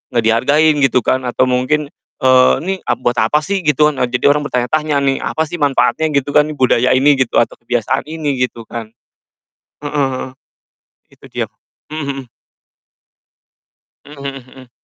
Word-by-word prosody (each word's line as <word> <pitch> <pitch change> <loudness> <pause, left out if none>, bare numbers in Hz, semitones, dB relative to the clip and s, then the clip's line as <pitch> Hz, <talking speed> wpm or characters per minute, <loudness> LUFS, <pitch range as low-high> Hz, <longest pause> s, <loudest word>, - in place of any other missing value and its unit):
nggak 115 - +2
dihargain 145 +8 +3
gitu 130 -3 +2
kan 130 -1 0
atau 125 - +1
mungkin, 130 +4 0 0.3
eee, 130 0 +5
"Ini, 190 +2 -1
a - - +2
buat 120 0 -2
apa 150 +8 +2
sih?" 195 +2 -1
Gitu 150 -2 +2
kan, 140 - -8
a 125 - +1
jadi 125 +3 +2
orang 145 0 0
bertanya-tanya 145 +5 -1
nih, 135 -1 +1
"Apa 160 - -2
sih 165 +2 -6
manfaatnya?" 145 +2 +1
Gitu 140 +1 0
kan, 150 +1 +4
budaya 130 -1 +2
ini, 140 +1 +3
gitu, 130 - 0
atau 115 - -3
kebiasaan 120 +4 -2
ini 150 -4 -3
gitu 115 -2 -12
kan. 115 -1 -7 1.0
Heeh, 135 -3 -2 0.8
itu - - -24
dia. - - -3 0.5
Mmm, 155 - -4 0.2
mhm. - - -34 1.8
Mmm, 145 -1 -12
mhm 135 -2 -7
mhm. 130 -2 -15
135 Hz, 160 wpm, -16 LUFS, 125-150 Hz, 1.8 s, eee